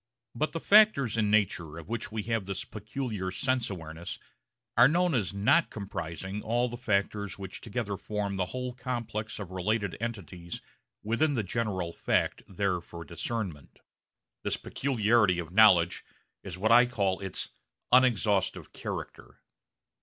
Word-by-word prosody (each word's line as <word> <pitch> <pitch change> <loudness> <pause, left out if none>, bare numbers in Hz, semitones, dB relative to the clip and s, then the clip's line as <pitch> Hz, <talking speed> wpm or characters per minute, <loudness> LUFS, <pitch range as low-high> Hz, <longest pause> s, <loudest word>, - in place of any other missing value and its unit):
But 155 +6 -1
the 165 - -2
factors 200 - +5
in 110 -2 +2
nature 90 -7 +1
of 85 - -9
which 115 +1 -4
we 110 -1 -3
have 115 -3 -1
this 95 -1 -3
peculiar 110 -2 -4
sense 125 +5 0
awareness 80 -2 -6 0.6
are 120 +2 +8
known 175 +3 +2
as 110 -8 +1
not 100 +12 +3
comprising 95 -1 -5
all 120 +3 +1
the 120 - -6
factors 100 -3 -1
which 95 -2 -7
together 105 -3 -3
form 105 -1 -3
the 95 -1 0
whole 125 +5 -4
complex 115 -4 -4
of 100 -4 -7
related 100 +2 -1
entities 90 -7 -5 0.4
within 135 +7 +1
the 115 - 0
general 95 -5 -2
fact - - 0
there 95 -2 -1
for 85 0 -10
discernment. 85 -3 -4 0.6
This - - -1
peculiarity 110 -7 +2
of 85 -1 -5
knowledge 95 -5 +6 0.4
is - - -6
what 110 +4 +1
I 120 +1 +8
call 100 -6 0
its 95 -3 -3 0.4
unexhaustive 110 -6 +3
character. - - -7
105 Hz, 145 wpm, -29 LUFS, 95-120 Hz, 0.6 s, are